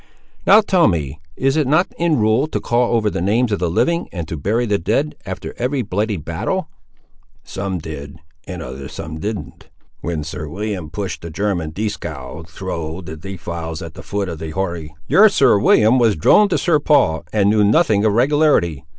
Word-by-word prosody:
"Now 215 - +8
tell 185 -5 +3
me, 75 -5 -2 0.2
is 135 +1 +1
it 155 -4 +1
not 155 +7 +2
in 170 -2 +1
rule, 110 +6 +2
to - - -3
call 120 0 +1
over 110 -2 +1
the 100 - -1
names 110 +5 +1
of 105 - 0
the 90 - 0
living, 170 - 0
and 85 -4 -5
to - - -3
bury 105 +11 0
the 105 -3 0
dead, 135 - 0
after 95 - -6
every 130 +2 0
bloody 105 +1 -1
battle?" 85 - -3 0.7
"Some 95 -1 -4
did 75 -3 -8 0.3
and 90 -2 -6
other 65 +1 -7
some 80 +2 -7
didn't. 105 +4 -6 0.3
When 80 -2 -3
Sir 80 0 -6
William 95 -1 -4
push'd 95 +2 -5
the 85 - -7
German, 85 -1 -2
Dieskau, 80 -8 -5
thro' 85 -2 -5
the 80 -3 -8
defiles 85 -2 -6
at 80 -1 -8
the - - -10
foot 100 -1 -3
of 85 -3 -6
the 80 0 -5
Hori—" 85 -3 -4
"Your 215 +3 +6
Sir 135 - +4
William 110 +5 +4
was 115 -3 +3
a - - -10
drone 205 - +5
to 175 - +1
Sir 160 -4 +2
Paul, 140 - +2
and 105 -1 +3
knew 105 -1 +3
nothing 105 -1 +3
of 110 -2 +3
regularity. 125 - +2
100 Hz, 195 wpm, -19 LUFS, 80-120 Hz, 0.7 s, Now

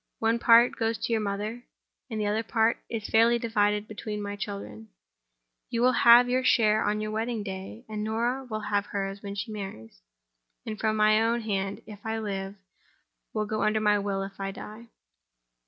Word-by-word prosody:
One 225 +1 +1
part 235 +1 +6
goes 225 -1 0
to 235 - -2
your 220 - +1
mother; 210 +3 -3 0.5
and 220 -2 -4
the 210 - 0
other 210 +2 +1
part 225 0 +1
is 220 -3 -4
fairly 230 +2 +4
divided 210 -2 0
between 210 0 -5
my 205 0 -4
children. 105 - -7 0.8
You 235 0 0
will 255 - +6
have 240 0 +7
your 255 +1 +1
share 220 -4 +4
on 210 +1 0
your 215 0 -3
wedding 220 0 -2
day 195 +4 -7
(and 215 -1 -4
Norah 235 +5 -1
will 215 -1 -3
have 205 -1 -1
hers 195 0 -4
when 200 0 -6
she 205 +2 -4
marries) 155 - -8 0.8
from 220 -1 +1
my 215 0 +4
own 230 +1 +1
hand, 195 -2 -3
if 210 -1 -11
I 225 0 -2
live; 195 -2 -4 0.8
and 215 0 -2
under 215 0 +1
my 210 -1 +3
will 200 -1 -2
if 195 0 -9
I 195 0 -2
die. 215 +4 -9
215 Hz, 180 wpm, -27 LUFS, 200-225 Hz, 0.8 s, have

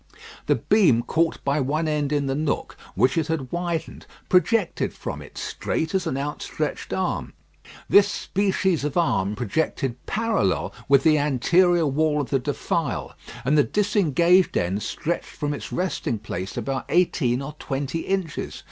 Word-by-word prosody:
The - - +4
beam 175 - +3
caught 165 +4 0
by 140 +2 +1
one 150 +4 0
end 150 -2 0
in 145 -1 +1
the 135 - -1
nook, 150 +1 -2 0.2
which 130 +6 +3
it 160 - -1
had 155 -6 -3
widened, 175 -2 -3 0.2
projected 185 +2 +2
from - - -6
it - - -13
straight 160 +3 -2
as 185 -3 0
an 135 - -1
outstretched 145 +2 -4
arm. - - -2 0.5
This 200 0 +6
species 190 -5 0
of 150 +1 -2
arm 105 - +1
projected 125 +2 -2
parallel 195 - 0 0.2
with 140 -1 +5
the 155 -2 +5
anterior 170 +5 +3
wall 150 +1 +1
of 140 - -3
the 135 - +3
defile, - - -2 0.3
and 145 +4 +3
the 145 - +6
disengaged 185 - +3
end 95 +4 0
stretched 170 +9 -3
from 145 -1 -1
its 145 - -7
resting 180 -10 -1
place 95 -3 -6
about 135 -1 -2
eighteen 150 -8 +2
or 145 +2 -6
twenty 140 +3 -3
inches. 190 -3 -3
150 Hz, 155 wpm, -24 LUFS, 135-175 Hz, 0.5 s, This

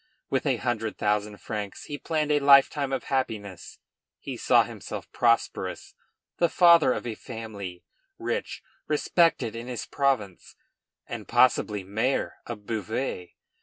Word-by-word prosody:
With 135 +2 0
a 130 -3 +2
hundred 115 -3 -2
thousand 105 0 0
francs 105 -2 -5
he 145 -1 -6
planned 155 -2 -1
a 145 - +4
lifetime 140 0 +5
of 135 - -2
happiness; 105 -9 -3 0.4
he - - -6
saw - - +4
himself - - -8
prosperous, 115 -1 0 0.4
the 170 - +3
father 170 -5 +6
of - - -3
a 120 - -3
family, 105 -7 -8 0.3
rich, - - -3 0.2
respected 155 -6 +2
in 115 +1 -6
his 125 -3 -4
province, 125 -10 -1 0.5
and, - - -7
possibly, 105 -5 +3
mayor 110 +8 -1
of 105 -4 -7
Beauvais. 110 -3 -3
120 Hz, 130 wpm, -26 LUFS, 105-140 Hz, 0.5 s, father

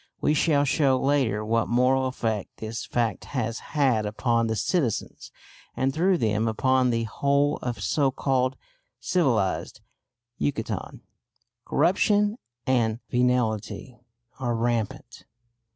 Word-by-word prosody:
We 150 - +2
shall 145 -2 +3
show 135 -2 +2
later 130 -7 +1
what 115 +1 +1
moral 130 +2 +2
effect 110 -5 -3
this 110 +1 -5
fact 115 -4 -1
has 115 -1 -1 0.2
had 130 -7 +3
upon 115 +2 0
the 110 - -1
citizens, 125 - -2 0.5
and 135 +1 +1
through 180 +4 +2
them 110 -3 0
upon 130 +3 +2
the 115 -1 0
whole 140 +5 +1
of 120 -1 -5
so 140 -3 +2
called 130 -1 0 0.4
civilised 125 - 0 0.6
Yucatan. 75 0 -3 0.6
Corruption 205 - +2 0.3
and 115 -4 +1
venality 120 -2 0 0.4
are 120 -3 -1
rampant. 115 -2 -2
125 Hz, 115 wpm, -25 LUFS, 115-140 Hz, 0.6 s, shall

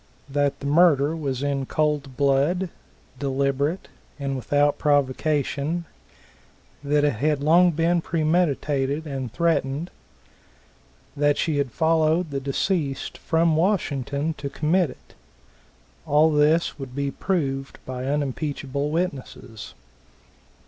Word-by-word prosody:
That 145 0 0
the - - -6
murder 150 -1 +4
was 140 -4 -3
in 140 -2 -1
cold 150 -4 -1
blood, 145 +7 +2 0.5
deliberate 140 +4 -1 0.3
and 140 -2 -3
without 145 +3 +1
provocation; 145 +3 0 1.0
that 145 +1 +2
it 145 -7 +1
had 150 +5 +1
been 140 - -5
long 170 +1 +4
premeditated 155 -3 0
and 135 -5 -4
threatened; 165 0 0 1.2
that 145 0 +2
she 155 -3 0
had 135 -3 -1
followed 160 +2 +2
the 140 - -2
deceased 140 +1 -2
from 165 -1 +2
Washington 155 -4 0
to 140 - -4
commit 160 +4 +1
it. - - -15 0.9
All 150 +2 +4
this 150 +2 +2
would 130 -2 -8
be 140 0 -1
proved 135 -8 -2
by 130 0 -5
unimpeachable 140 0 -2
witnesses. 145 - -4
145 Hz, 110 wpm, -24 LUFS, 140-160 Hz, 1.2 s, murder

